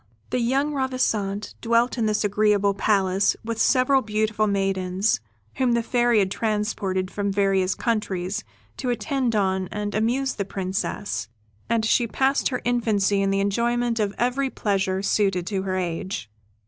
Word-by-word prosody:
The 250 Hz, -, +1 dB
young 270 Hz, +5 st, +1 dB
Ravissante 220 Hz, -7 st, -1 dB
dwelt 235 Hz, +1 st, +2 dB
in 230 Hz, -3 st, 0 dB
this 215 Hz, 0 st, +1 dB
agreeable 205 Hz, -1 st, +2 dB
palace, 195 Hz, -1 st, +2 dB
with 225 Hz, -1 st, -2 dB
several 265 Hz, +1 st, +4 dB
beautiful 215 Hz, -1 st, 0 dB
maidens, 195 Hz, -, 0 dB, 0.4 s
whom 255 Hz, -2 st, +2 dB
the 235 Hz, -1 st, +1 dB
Fairy 240 Hz, -1 st, +2 dB
had 195 Hz, -2 st, +2 dB
transported 205 Hz, -4 st, -1 dB
from 200 Hz, -1 st, -1 dB
various 195 Hz, -2 st, +1 dB
countries 205 Hz, -5 st, -2 dB, 0.3 s
to 255 Hz, -, -3 dB
attend 240 Hz, +1 st, -1 dB
on 190 Hz, -2 st, +1 dB
and 205 Hz, +2 st, -4 dB
amuse 250 Hz, +5 st, 0 dB
the 200 Hz, -, -2 dB
Princess, 190 Hz, -, -3 dB, 0.4 s
and 230 Hz, -1 st, +1 dB
she 235 Hz, +1 st, +3 dB
passed 270 Hz, +4 st, +1 dB
her 250 Hz, -2 st, -3 dB
infancy 215 Hz, -5 st, +2 dB
in 195 Hz, -, +1 dB
the 195 Hz, 0 st, +1 dB
enjoyment 235 Hz, +3 st, 0 dB
of 205 Hz, -1 st, -1 dB
every 255 Hz, +3 st, 0 dB
pleasure 195 Hz, -4 st, -1 dB
suited 195 Hz, -4 st, +1 dB
to 195 Hz, 0 st, -2 dB
her 190 Hz, -1 st, -2 dB
age. 175 Hz, -, -4 dB
210 Hz, 150 wpm, -24 LUFS, 195-235 Hz, 0.4 s, several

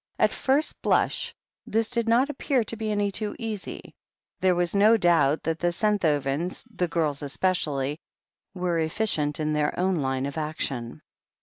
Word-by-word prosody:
At -, -, +3 dB
first 275 Hz, +4 st, +1 dB
blush, -, -, +1 dB, 0.4 s
this 225 Hz, +1 st, +1 dB
did 235 Hz, -2 st, 0 dB
not 245 Hz, +4 st, +4 dB
appear 270 Hz, -3 st, 0 dB
to 225 Hz, -, -4 dB
be 220 Hz, -1 st, -3 dB
any 205 Hz, -1 st, 0 dB
too 210 Hz, +1 st, -4 dB
easy. 220 Hz, -4 st, -6 dB, 0.5 s
There 185 Hz, -1 st, +3 dB
was 175 Hz, -1 st, +1 dB
no 210 Hz, +3 st, +5 dB
doubt 165 Hz, -6 st, +3 dB
that 165 Hz, 0 st, -1 dB
the 175 Hz, 0 st, +1 dB
Senthovens, 170 Hz, -5 st, 0 dB
the 180 Hz, -, 0 dB
girls 155 Hz, -4 st, -1 dB
es 145 Hz, -1 st, -5 dB
pecially, 150 Hz, -6 st, 0 dB, 0.6 s
were 180 Hz, -2 st, 0 dB
efficient 160 Hz, -3 st, 0 dB
in 155 Hz, 0 st, 0 dB
their 150 Hz, +1 st, 0 dB
own 185 Hz, 0 st, +2 dB
line 135 Hz, -2 st, -1 dB
of 140 Hz, +3 st, -4 dB
action. 140 Hz, -6 st, -4 dB
175 Hz, 165 wpm, -26 LUFS, 150-210 Hz, 0.6 s, no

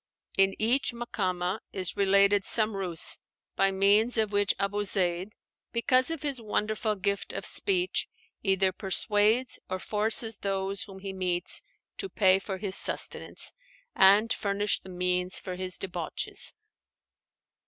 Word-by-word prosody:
In 195 Hz, 0 st, +3 dB
each 245 Hz, +4 st, +1 dB
Makámah 190 Hz, -5 st, -3 dB
is 185 Hz, -2 st, -3 dB
related 200 Hz, 0 st, +3 dB
some 215 Hz, -1 st, +2 dB
ruse, 180 Hz, -4 st, +2 dB, 0.4 s
by 195 Hz, -, +3 dB
means 200 Hz, +5 st, +3 dB
of 215 Hz, -2 st, +1 dB
which 205 Hz, -1 st, +1 dB
Abu 205 Hz, +1 st, -1 dB
Zeid, 185 Hz, -1 st, +1 dB, 0.4 s
because 255 Hz, +3 st, +2 dB
of 325 Hz, -3 st, -4 dB
his 275 Hz, -5 st, -2 dB
wonderful 215 Hz, 0 st, -1 dB
gift 200 Hz, 0 st, -2 dB
of -, -, -5 dB
speech, 370 Hz, -2 st, +1 dB, 0.3 s
either 190 Hz, -1 st, +2 dB
persuades 210 Hz, +5 st, +2 dB
or 185 Hz, -, -2 dB
forces 215 Hz, +2 st, +2 dB
those 195 Hz, 0 st, -2 dB
whom 195 Hz, -2 st, -12 dB
he 195 Hz, 0 st, -6 dB
meets 180 Hz, -2 st, -2 dB, 0.4 s
to 390 Hz, -, -4 dB
pay 190 Hz, -, +3 dB
for 195 Hz, -1 st, -6 dB
his 190 Hz, -1 st, -1 dB
sustenance, -, -, +1 dB, 0.4 s
and 200 Hz, +4 st, +5 dB
furnish 205 Hz, 0 st, 0 dB
the 190 Hz, -, -14 dB
means 180 Hz, 0 st, -1 dB
for 185 Hz, -2 st, -6 dB
his 185 Hz, 0 st, -2 dB
debauches. 175 Hz, -4 st, -3 dB
200 Hz, 135 wpm, -28 LUFS, 190-215 Hz, 0.4 s, and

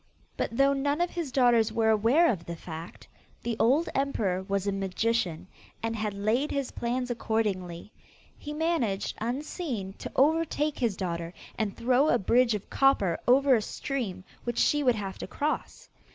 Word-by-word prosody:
But 230 Hz, -, -3 dB
though 275 Hz, 0 st, +5 dB
none 285 Hz, +2 st, 0 dB
of 350 Hz, 0 st, +1 dB
his 335 Hz, -6 st, -4 dB
daughters 240 Hz, -4 st, +4 dB
were 220 Hz, -1 st, +2 dB
aware 235 Hz, +11 st, +4 dB
of 170 Hz, -7 st, -5 dB
the 170 Hz, -, -4 dB
fact, 165 Hz, 0 st, -9 dB, 0.4 s
the 235 Hz, -1 st, -1 dB
old 285 Hz, +9 st, +3 dB
emperor 215 Hz, -9 st, 0 dB
was 195 Hz, 0 st, -2 dB
a 200 Hz, -, +1 dB
magician, 195 Hz, -2 st, -1 dB, 0.4 s
and 225 Hz, 0 st, -1 dB
had 210 Hz, -2 st, -2 dB
laid 220 Hz, +9 st, +1 dB
his 275 Hz, -2 st, -2 dB
plans 245 Hz, +1 st, -2 dB
accordingly. 210 Hz, -6 st, -2 dB, 0.4 s
He 295 Hz, -, -8 dB
managed, 300 Hz, -, -1 dB
unseen, 245 Hz, -, -3 dB
to -, -, -6 dB
overtake 305 Hz, +1 st, +2 dB
his 230 Hz, -7 st, 0 dB
daughter, 170 Hz, -2 st, -4 dB, 0.2 s
and 210 Hz, -3 st, -2 dB
throw 255 Hz, +4 st, +3 dB
a 240 Hz, -, +4 dB
bridge 235 Hz, +2 st, +3 dB
of 205 Hz, -, -6 dB
copper 205 Hz, -11 st, +2 dB
over 270 Hz, +2 st, +5 dB
a 230 Hz, -, +4 dB
stream 215 Hz, -6 st, -4 dB, 0.2 s
which 240 Hz, -1 st, -3 dB
she 295 Hz, -, +3 dB
would 250 Hz, -4 st, +3 dB
have 195 Hz, -3 st, -5 dB
to -, -, -5 dB
cross. 305 Hz, -, -3 dB
230 Hz, 165 wpm, -28 LUFS, 195-275 Hz, 0.4 s, though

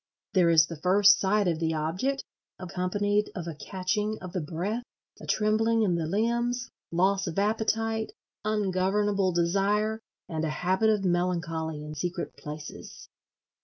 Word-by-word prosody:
There 180 Hz, -4 st, +4 dB
is 165 Hz, -1 st, +6 dB
the 165 Hz, -2 st, -9 dB
first 200 Hz, +3 st, +6 dB
sight 200 Hz, 0 st, +2 dB
of 165 Hz, -2 st, 0 dB
the 160 Hz, -1 st, 0 dB
Object, 185 Hz, -, -1 dB, 0.3 s
accompanied 205 Hz, +3 st, 0 dB
of 180 Hz, -4 st, -4 dB
a 170 Hz, -, -4 dB
catching 205 Hz, +6 st, -2 dB
of 185 Hz, -1 st, -8 dB
the 180 Hz, -, -1 dB
breath, 180 Hz, +9 st, -3 dB, 0.4 s
a -, -, -10 dB
trembling 220 Hz, +1 st, +2 dB
in 190 Hz, -4 st, +2 dB
the 165 Hz, -2 st, -1 dB
limbs, 235 Hz, +5 st, 0 dB, 0.2 s
loss 190 Hz, +3 st, +2 dB
of 170 Hz, -, -4 dB
appetite, 220 Hz, +1 st, 0 dB, 0.3 s
ungovernable 200 Hz, -1 st, +1 dB
desire, 200 Hz, +5 st, +1 dB, 0.3 s
and 160 Hz, -1 st, -3 dB
a 160 Hz, -, 0 dB
habit 185 Hz, +7 st, +1 dB
of 210 Hz, -3 st, +1 dB
melancholy 170 Hz, -3 st, -1 dB
in 150 Hz, 0 st, -7 dB
secret 175 Hz, +4 st, -4 dB
places. 150 Hz, 0 st, -9 dB
190 Hz, 145 wpm, -28 LUFS, 170-210 Hz, 0.4 s, is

